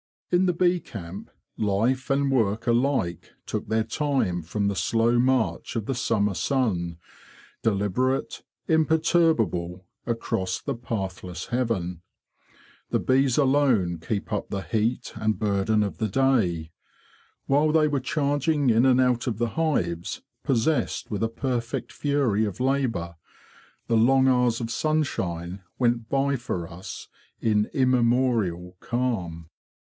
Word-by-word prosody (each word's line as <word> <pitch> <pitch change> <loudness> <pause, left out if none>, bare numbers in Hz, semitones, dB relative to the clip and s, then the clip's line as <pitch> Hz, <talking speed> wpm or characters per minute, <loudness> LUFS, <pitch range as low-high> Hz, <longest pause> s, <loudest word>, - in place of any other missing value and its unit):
In 180 +1 +4
the 180 - +2
bee 175 +1 +2
camp, 95 - -8 0.3
life 115 +6 0
and 140 0 +2
work 115 -3 +1
alike 120 - 0
took - - -4
their 110 +1 +1
time 135 - 0
from 100 +6 -2
the 100 - -1
slow 115 +6 +2
march 130 -2 +1
of 110 -3 -2
the 135 - -1
summer 105 -5 +1
sun, 90 -9 -1 0.6
deliberate, 115 +5 0 0.3
imperturbable, 155 - +2 0.2
across 95 -5 -1
the 140 - -3
pathless 95 -7 -5
heaven. 105 -9 -1 0.9
The - - +1
bees 130 -1 +2
alone 130 - +3
keep 100 +6 -4
up 105 - -2
the 100 - -3
heat 110 +4 -1
and 110 0 0
burden 105 +1 +1
of 100 - -4
the 110 - 0
day. 95 -10 +1 0.7
While 150 +3 +3
they 155 -1 +4
were 145 -2 0
charging 145 +1 +1
in 115 +3 +4
and 130 0 +5
out 125 0 +1
of 115 -4 -1
the 120 0 0
hives, 90 - -1 0.2
possessed 135 +3 0
with 105 - -2
a 115 - +1
perfect 120 0 -3
fury 135 -8 +1
of 100 +2 -5
labour, 125 -11 0 0.7
the 115 - +2
long 130 +4 +4
hours 125 -2 +2
of 115 0 -3
sunshine 95 - -1 0.2
went 120 -2 +1
by 140 0 +1
for 90 -8 -4
us 90 +2 -9 0.3
in 105 -2 +2
immemorial 120 - +1
calm. 90 -10 -2
115 Hz, 130 wpm, -25 LUFS, 100-135 Hz, 0.9 s, and